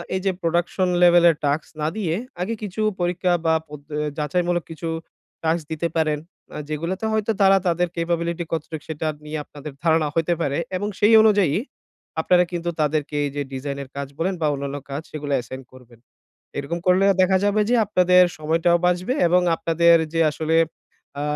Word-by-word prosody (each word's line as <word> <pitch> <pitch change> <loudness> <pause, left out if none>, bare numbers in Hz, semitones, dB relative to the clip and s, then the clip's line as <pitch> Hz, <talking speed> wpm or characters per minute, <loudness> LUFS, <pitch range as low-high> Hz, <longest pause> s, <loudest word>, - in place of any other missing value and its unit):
এই 190 - -1
যে 195 - +3
প্রোডাকশন 175 +2 0
লেভেলের 175 -2 +6
টাস্ক 145 +2 0
না 150 - +1
দিয়ে 170 -6 -1 0.3
আগে 200 +6 -1
কিছু 210 +1 -4 0.2
পরীক্ষা 175 +1 0
বা 160 - +4 0.2
পদ্ধ 145 -1 -11 0.2
এ - - -1
যাচাইমূলক 175 +3 0
কিছু 165 +1 -5 0.5
টাস্ক 160 +1 +1
দিতে 160 +2 -1
পারেন। 155 -2 +1 0.4
আ - - -4
যেগুলোতে 170 +7 -3
হয়তো 220 0 +1
তারা 195 0 +6
তাদের 175 +1 +1
ক্যাপাবিলিটি 170 0 -1
কতটুক 160 -1 -4
সেটা 160 0 -3 0.2
নিয়ে 155 +1 -4
আপনাদের 145 0 -10
ধারণা 160 -2 +3
হইতে 165 +1 +1
পারে 140 -3 0 0.2
এবং 205 +3 -3
সেই 210 +2 +5
অনুযায়ী 205 -8 +3 0.7
আপনারা 180 +1 +4
কিন্তু 175 -1 -3
তাদেরকে 150 0 -1
এই 140 - -3
যে 145 - -1
ডিজাইনের 140 0 -5
কাজ 140 -1 -4
বলেন 185 +3 0
বা 155 - +2
অন্যান্য 140 0 -4
কাজ 140 +2 -3
সেগুলা 145 -2 -4
অ্যাসাইন 130 +2 -6
করবেন। 120 -3 -17 0.6
এরকম 155 +5 -3
করলে 185 +2 +4 0.2
দেখা 190 +1 +3
যাবে 205 +1 +2
যে, - - +4
আপনাদের 180 -2 +5 0.2
সময়টাও 165 +3 +2
বাঁচবে 180 +7 0
এবং 180 +2 +4 0.2
আপনাদের 170 +1 +4 0.2
যে 165 - +1
আসলে 160 +1 0 0.6
আ - - -2
165 Hz, 170 wpm, -22 LUFS, 150-180 Hz, 0.7 s, লেভেলের